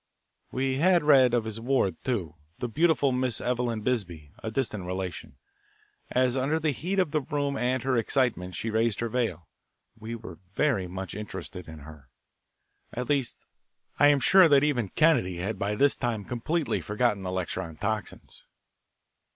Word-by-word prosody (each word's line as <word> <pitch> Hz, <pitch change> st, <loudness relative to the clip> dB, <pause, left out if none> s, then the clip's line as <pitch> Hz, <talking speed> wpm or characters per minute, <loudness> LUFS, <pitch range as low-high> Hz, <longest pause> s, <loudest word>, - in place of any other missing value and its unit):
We 130 Hz, +1 st, -1 dB
had 175 Hz, +1 st, +4 dB
read 130 Hz, -5 st, +6 dB
of 120 Hz, -, +1 dB
his 110 Hz, 0 st, -5 dB
ward, 115 Hz, -7 st, +1 dB
too, 95 Hz, -11 st, -2 dB, 0.2 s
the 125 Hz, -, -3 dB
beautiful 145 Hz, +1 st, +2 dB
Miss 125 Hz, -2 st, 0 dB
Eveline 120 Hz, -2 st, -1 dB
Bisbee, 90 Hz, -, -2 dB
a 110 Hz, -, -3 dB
distant 110 Hz, -6 st, -2 dB
relation. 90 Hz, -7 st, -5 dB, 0.7 s
As 125 Hz, 0 st, +2 dB
under 140 Hz, +5 st, +1 dB
the 155 Hz, -1 st, +1 dB
heat 175 Hz, +9 st, -3 dB
of 180 Hz, -6 st, +2 dB
the 155 Hz, -1 st, +1 dB
room 145 Hz, -1 st, -2 dB
and 125 Hz, -1 st, 0 dB
her 130 Hz, -1 st, +1 dB
excitement, 115 Hz, -7 st, 0 dB
she 110 Hz, +6 st, -3 dB
raised 110 Hz, 0 st, +1 dB
her 115 Hz, -, -1 dB
veil, 105 Hz, -9 st, -2 dB, 0.5 s
we 115 Hz, +1 st, -6 dB
were 100 Hz, -8 st, -10 dB, 0.2 s
very 125 Hz, -12 st, +1 dB
much 95 Hz, +1 st, -6 dB
interested 100 Hz, -3 st, -7 dB
in 80 Hz, -1 st, -10 dB
her. 75 Hz, -3 st, -13 dB, 0.8 s
At 125 Hz, 0 st, -5 dB
least, 140 Hz, -4 st, -1 dB, 0.5 s
I 145 Hz, -, +7 dB
am 145 Hz, -1 st, +5 dB
sure 185 Hz, +6 st, +6 dB
that 140 Hz, -1 st, +5 dB
even 125 Hz, -9 st, +1 dB
Kennedy 150 Hz, -, +2 dB
had 95 Hz, +3 st, -3 dB
by 105 Hz, +1 st, -1 dB
this 140 Hz, +5 st, +3 dB
time 115 Hz, -5 st, -2 dB
completely 150 Hz, +6 st, -1 dB
forgotten 105 Hz, -1 st, 0 dB
the 90 Hz, -1 st, -4 dB
lecture 90 Hz, -2 st, -2 dB
on 80 Hz, -2 st, -8 dB
toxins. 105 Hz, 0 st, -4 dB
120 Hz, 165 wpm, -27 LUFS, 95-135 Hz, 0.8 s, I